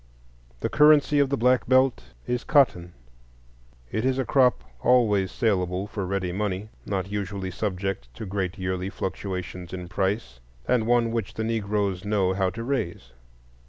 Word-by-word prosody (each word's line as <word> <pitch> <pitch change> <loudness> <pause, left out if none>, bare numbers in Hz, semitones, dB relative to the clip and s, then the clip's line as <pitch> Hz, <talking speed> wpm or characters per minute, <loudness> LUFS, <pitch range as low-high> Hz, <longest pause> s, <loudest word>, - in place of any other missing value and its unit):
The - - +1
currency 150 -1 +5
of 140 -2 +3
the 140 - 0
Black 125 0 +2
Belt 130 -1 +4 0.2
is 125 -1 -2
cotton. 90 - +3 1.0
It 110 - -1
is 130 0 +1
a 130 - 0
crop 125 - +3 0.2
always 105 -6 +3
salable 95 -4 0
for 100 -2 -4
ready 95 -2 -1
money, 100 +1 -2 0.2
not 95 -1 -2
usually 100 -2 -3
subject 95 - -3
to 110 - -6
great 95 -2 -3
yearly 95 0 -2
fluctuations 90 -2 -5
in 90 -1 -5
price, 95 - -2 0.3
and 115 -3 +2
one 120 -1 +3
which 115 -4 -3
the 110 - -2
Negroes 105 -4 -1
know 100 -3 +1
how 95 -1 +1
to 115 +5 -6
raise. 85 - -3
100 Hz, 155 wpm, -25 LUFS, 95-120 Hz, 1.0 s, currency